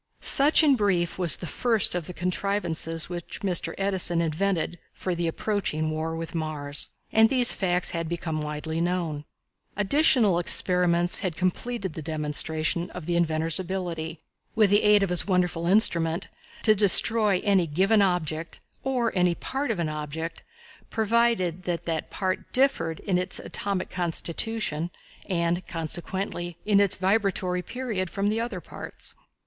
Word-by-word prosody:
Such 295 +4 +6
in 285 -3 +5
brief 185 -6 0
was 175 -5 +6
the - - -8
first 225 +3 +1
of 175 -3 -3
the 180 - -7
contrivances 175 -3 -2
which 175 -1 -7
Mr. 185 -3 0
Edison 190 -3 +1
invented 170 +1 -1 0.2
for 185 - -3
the 170 0 -2
approaching 165 -4 -2
war 160 +1 -3
with 165 +1 -6
Mars. 150 -3 -4 0.2
And 220 0 +5
these 250 -2 +4
facts 180 -2 0
had 165 -2 -4
become 165 -2 -3
widely 150 +2 -4
known. 170 -4 -2 0.5
Additional 210 - +4
experiments 175 0 +1
had 180 -4 -3
completed 190 +1 -2
the 160 - -7
demonstration 155 +2 -1
of 180 -3 -9
the 175 +1 -1
inventor's 160 0 +1
ability, 170 -4 -4 0.4
with 215 -3 +3
the 205 - +5
aid 210 -1 +4
of 190 - -1
his 180 +1 +3
wonderful 180 -3 0
instrument, 170 -4 +3 0.3
to 215 - +6
destroy 210 0 +5
any 195 -4 +2
given 195 +8 +2
object, 165 -4 -1 0.2
or 250 -5 -1
any 180 -1 +2
part 270 +8 -4
of 225 - -1
an 170 -2 -1
object, 155 +2 -5 0.5
provided 220 -6 0
that 175 -2 -3
that 160 -2 -3
part 185 -2 -3
differed 255 - +1
in 185 -3 0
its 180 0 +1
atomic 195 -2 -3
constitution, 175 0 -2 0.4
and 170 0 -1
consequently 175 +1 -4
in 205 -1 +3
its 200 -2 +3
vibratory 190 -2 0
period, 220 -5 -4
from 200 +3 -1
the 220 +2 -1
other 230 -6 -4
parts. - - -7
180 Hz, 150 wpm, -25 LUFS, 165-200 Hz, 0.5 s, Such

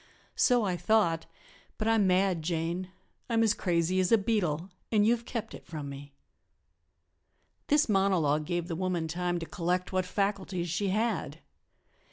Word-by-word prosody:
So 245 -3 +4
I 185 -3 0
thought, 175 -3 +2 0.5
but 215 - -2
I'm 225 -3 +3
mad, 185 -2 +2
Jane, 170 +3 -2 0.4
I'm 225 -1 +3
as 220 - +4
crazy 175 +1 0
as 185 -1 +1
a 230 - +7
beetle; 195 -5 -1 0.2
and 210 -2 +4
you 235 +2 +5
have 235 0 -11
kept 225 -3 -5
it - - -11
from 150 -4 -6
me." 140 +1 -9 1.6
This 295 +1 +3
monologue 185 -8 +2
gave 175 0 -2
the 170 - -3
woman 180 -2 -1
time 175 +2 -1
to 165 - -4
collect 180 +2 -2
what 185 -1 0
faculties 190 -3 -1
she 195 +4 0
had. 220 +4 -1
185 Hz, 160 wpm, -29 LUFS, 170-210 Hz, 1.6 s, a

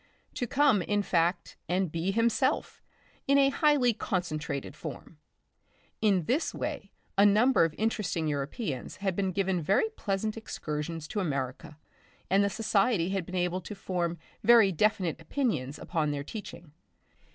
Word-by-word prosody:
To 245 - -2
come, 270 -6 +3
in 205 +3 0
fact, 175 -1 0
and 180 -2 0
be 165 +3 -1
himself 230 +6 +1 0.5
in 280 +1 +5
a 275 -1 +5
highly 280 -4 +3
concentrated 155 -9 -3
form. 155 +1 -9 0.8
In 195 -5 +3
this 265 - 0
way - - -4 0.3
a - - +8
number 210 0 +5
of 160 - -4
interesting 210 -7 -1
Europeans 145 - -3
had 190 -2 -2
been 190 -1 0
given 190 -1 0
very 195 - +2
pleasant 215 - -3
excursions 155 -6 -5
to 210 - -2
America, 140 -3 -3 0.5
and 195 +1 +5
the 200 - +2
society 200 -3 +1
had 190 -3 -2
been 185 - -6
able 180 0 0
to 205 +4 -8
form 175 -3 -2 0.3
very 225 -3 +7
definite 185 -2 +1
opinions 155 - -2
upon 160 -4 -1
their 145 -1 -2
teaching. 175 -3 -9
190 Hz, 145 wpm, -29 LUFS, 165-220 Hz, 0.8 s, a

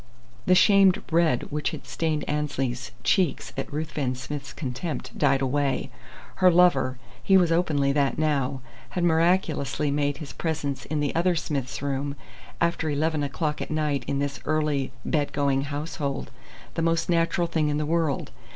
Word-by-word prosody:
The 185 - +6
shamed 195 -1 +5
red 160 -6 +2
which 150 +1 -1
had - - -8
stained 155 -2 -2
Annesley's 135 -4 -2
cheeks 180 -4 +1
at 135 - -4
Ruthven 150 -4 -2
Smith's 140 +2 -6
contempt 140 +3 -5
died 140 -2 +2
away. 140 +1 0 0.5
Her 185 -1 +6
"lover" 165 -8 +4 0.2
he 195 - +5
was 175 -3 +3
openly 155 -5 +2
that 140 -1 +1
now 140 -4 0 0.4
had 175 - +1
miraculously 160 -4 +2
made 145 0 0
his 150 -2 -8
presence 150 -4 -3
in 155 -1 -2
the 145 - 0
other 175 +2 +2
Smith's 140 -5 -3
room, 140 0 -2 0.4
after 170 -2 +1
eleven 155 +1 0
o'clock 150 +2 -2
at - - -4
night 150 -2 0
in 140 - -1
this 140 0 -2
early 150 -3 0
bed 145 -2 0
going 140 -1 +1
household, 145 -1 -4 0.4
the - - -2
most 165 0 +1
natural 170 0 +2
thing 160 -3 0
in 145 - 0
the 150 - -1
world. 160 -3 0
150 Hz, 160 wpm, -26 LUFS, 140-165 Hz, 0.5 s, The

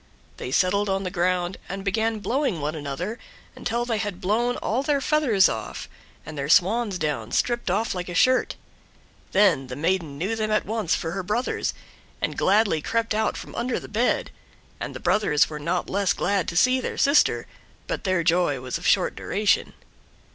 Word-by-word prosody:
They - - -5
settled 200 +7 +2
on 195 0 0
the 185 - -3
ground 180 0 0
and 195 +1 -5
began 220 +3 0
blowing 250 - 0
one 150 +1 -2
another 160 - -4 0.4
until 235 +1 -2
they 230 -3 -1
had 205 -4 -3
blown 235 +6 +1
all 235 +5 -1
their 285 0 +1
feathers 270 -9 +3
off, 110 -1 -5 0.4
and 155 - -8
their 140 0 -3
swan's 200 +4 +3
down 155 -3 -2
stripped 240 -4 0
off 210 +5 0
like 180 -1 -5
a 175 - -5
shirt. 255 +8 +3 0.8
Then 185 -9 +3
the 125 - -6
maiden 165 -1 -1
knew 195 +9 -1
them 215 -1 -1
at 215 0 +1
once 215 -5 0
for 165 - -3
her 195 - -3
brothers, 215 +7 -1 0.4
and - - -2
gladly 195 -5 +3
crept 230 +6 -1
out 220 +1 0
from - - -9
under 240 +1 -1
the - - -10
bed, 230 +4 0 0.5
and - - -5
the - - -5
brothers 155 -9 +2
were 150 - -5
not 175 +4 -1
less 200 -1 +1
glad 195 -1 0
to 170 - -2
see 255 +5 +4
their - - -4
sister, 280 +2 +3 0.4
but - - -4
their 185 -4 +1
joy 165 -4 +2
was 125 0 -4
of - - -3
short - - +3
duration. 210 0 0
195 Hz, 185 wpm, -24 LUFS, 170-225 Hz, 0.8 s, see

